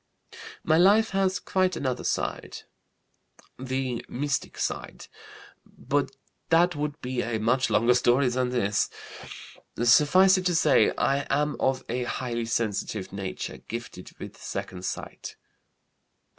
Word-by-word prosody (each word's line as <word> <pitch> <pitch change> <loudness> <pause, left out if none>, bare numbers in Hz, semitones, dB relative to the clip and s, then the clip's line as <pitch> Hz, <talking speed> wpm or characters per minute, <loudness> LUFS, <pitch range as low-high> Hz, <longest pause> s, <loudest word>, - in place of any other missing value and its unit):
"My 160 +1 +3
life 210 +5 +5
has 195 -1 +1
quite 185 -2 0
another 130 -4 -2
side, - - -3 1.0
the 130 -2 -3
mystic 145 +2 -2
side. - - -4 0.6
But 140 -1 -2 0.4
that 175 +1 +4
would 150 +1 -3
be 125 -1 -2
a 115 -1 -2
much 125 +5 +1
longer 120 +3 +4
story 125 +2 +3
than 125 0 0
this. 105 -5 0 0.9
Suffice 185 +10 +5
it 185 - -6
to 175 - +1
say, 155 -3 +4
I 140 +1 +1
am 150 +1 +1
of 130 0 0
a 125 +1 -2
highly 120 -2 -3
sensitive 105 -3 -2
nature, 95 -2 -5
gifted - - -8
with - - -10
second 90 0 -6
sight." - - -6
130 Hz, 125 wpm, -26 LUFS, 120-155 Hz, 1.0 s, life